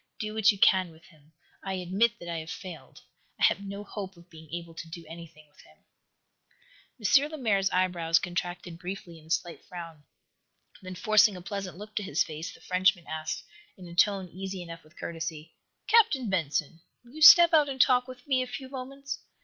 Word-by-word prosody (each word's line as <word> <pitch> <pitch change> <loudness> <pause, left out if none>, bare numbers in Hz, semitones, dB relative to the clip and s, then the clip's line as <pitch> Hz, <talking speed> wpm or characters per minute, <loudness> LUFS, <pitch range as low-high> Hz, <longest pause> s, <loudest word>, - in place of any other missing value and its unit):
Do 215 0 -4
what 220 +1 +5
you 205 - -7
can 185 -2 +4
with 160 +1 -18
him. 155 -3 -23 0.3
I 195 - -3
admit 195 +6 +1
that 175 - -11
I 170 -1 -3
have 160 0 -8
failed. 180 -2 -9 0.4
I - - -2
have - - +4
no 200 +1 -6
hope 195 -2 -7
of 170 +1 -19
being 160 -2 -14
able 170 0 -6
to 165 0 -9
do 165 0 -9
anything 160 -2 -12
with 145 - -21
him." - - -21 1.5
M. 295 - -3
Lemaire's 215 -11 +1
eyebrows 175 -3 +2
contracted 175 -1 -4
briefly, 180 -2 -7
in 155 - -19
a - - -18
slight 170 +1 -2
frown. 165 -4 -9 0.8
Then, 185 -1 -8
forcing 215 +1 +4
a - - -9
pleasant 195 -2 -5
look 210 +2 -11
to - - +1
his 185 -4 +1
face, 155 +2 -7
the - - -16
Frenchman 185 -1 +2
asked, 160 +2 -4 0.3
in 180 -2 -11
a 170 - -10
tone 195 +1 +2
easy 190 +1 -6
enough 165 -1 -10
with 155 +2 -23
courtesy: 160 -1 -6 0.3
"Captain 360 - +4
Benson, 160 -2 -1 0.2
will 240 - -17
you 315 - -9
step 340 +2 +10
out 300 -3 +5
and 265 -1 -5
talk 250 0 +4
with 255 -1 -11
me 265 -2 +2
a 255 - -3
few 255 +2 -7
moments? 275 +1 -6
185 Hz, 200 wpm, -28 LUFS, 165-215 Hz, 1.5 s, step